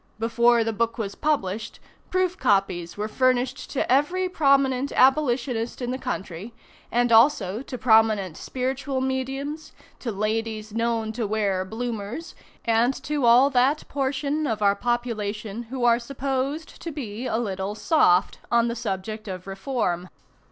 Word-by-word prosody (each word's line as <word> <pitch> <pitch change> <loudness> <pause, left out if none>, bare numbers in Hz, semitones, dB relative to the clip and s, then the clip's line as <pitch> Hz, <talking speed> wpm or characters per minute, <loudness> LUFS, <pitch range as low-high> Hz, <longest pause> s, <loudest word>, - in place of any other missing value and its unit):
Before 235 +1 +3
the 225 0 -2
book 230 +2 -1
was 200 -4 -3
published, 225 -9 -2 0.3
proof 370 -1 +1
copies 185 -4 0
were 210 +1 -2
furnished 255 +2 0
to 265 - -1
every 350 +8 +2
prominent 275 -5 +2
abolitionist 250 -4 +2
in 245 -1 -3
the 260 - -3
country, 205 -4 -5 0.4
and 240 0 +2
also 225 -4 +4
to 265 -1 -7
prominent 220 -7 +3
spiritual 260 +1 -3
mediums, 270 +4 -3 0.3
to 235 - -3
ladies 215 +1 -2
known 230 -1 0
to 225 -1 -3
wear 200 -3 0
Bloomers, 230 - -5 0.3
and 230 +3 +3
to 290 -4 0
all 250 +4 +6
that 265 +4 +2
portion 285 +2 -1
of 215 -3 -1
our 200 0 +4
population 220 -2 -2
who 255 -1 -2
are 235 0 +5
supposed 275 +4 -3
to 335 - -5
be 245 -5 -5
a - - 0
little 200 -3 -3
"soft" 200 - +3
on 235 0 +3
the 235 - -3
subject 215 0 -4
of 185 -2 -6
reform. 195 -3 -2
235 Hz, 145 wpm, -25 LUFS, 215-265 Hz, 0.4 s, all